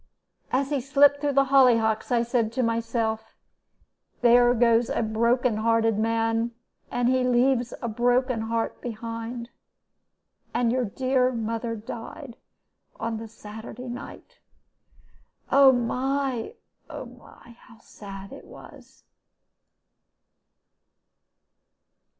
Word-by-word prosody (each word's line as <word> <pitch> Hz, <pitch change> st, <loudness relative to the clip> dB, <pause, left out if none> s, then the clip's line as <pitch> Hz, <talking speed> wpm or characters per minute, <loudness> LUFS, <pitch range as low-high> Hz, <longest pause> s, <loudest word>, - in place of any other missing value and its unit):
As 275 Hz, +2 st, 0 dB
he 280 Hz, -3 st, 0 dB
slipped 285 Hz, +2 st, +4 dB
through 290 Hz, -1 st, 0 dB
the 275 Hz, 0 st, +3 dB
hollyhocks 230 Hz, -4 st, +4 dB
I 235 Hz, -1 st, +3 dB
said 235 Hz, -2 st, 0 dB
to 255 Hz, -, 0 dB
myself, 230 Hz, -1 st, -2 dB, 0.9 s
'There 245 Hz, 0 st, +5 dB
goes 235 Hz, 0 st, +3 dB
a -, -, 0 dB
broken 235 Hz, +2 st, +1 dB
hearted 225 Hz, -1 st, +2 dB
man, 225 Hz, +1 st, 0 dB, 0.4 s
and 245 Hz, 0 st, 0 dB
he 255 Hz, 0 st, +2 dB
leaves 250 Hz, 0 st, +2 dB
a -, -, -1 dB
broken 245 Hz, +1 st, +1 dB
heart 225 Hz, 0 st, -2 dB
behind.' 230 Hz, +1 st, -6 dB, 1.0 s
And 240 Hz, -1 st, +2 dB
your 250 Hz, 0 st, 0 dB
dear 255 Hz, +4 st, +1 dB
mother 230 Hz, 0 st, -3 dB
died 230 Hz, +4 st, -8 dB, 0.6 s
on 225 Hz, -1 st, -3 dB
the 225 Hz, +1 st, -7 dB
Saturday 220 Hz, +3 st, -10 dB
night. 240 Hz, +1 st, -10 dB, 1.1 s
Oh 275 Hz, -1 st, +7 dB
my! 260 Hz, -, -1 dB, 0.3 s
oh -, -, -7 dB
my! 235 Hz, -, -16 dB
how 230 Hz, -3 st, -18 dB
sad 195 Hz, -3 st, -11 dB
it -, -, -11 dB
was!" -, -, -15 dB
235 Hz, 110 wpm, -25 LUFS, 225-255 Hz, 1.1 s, Oh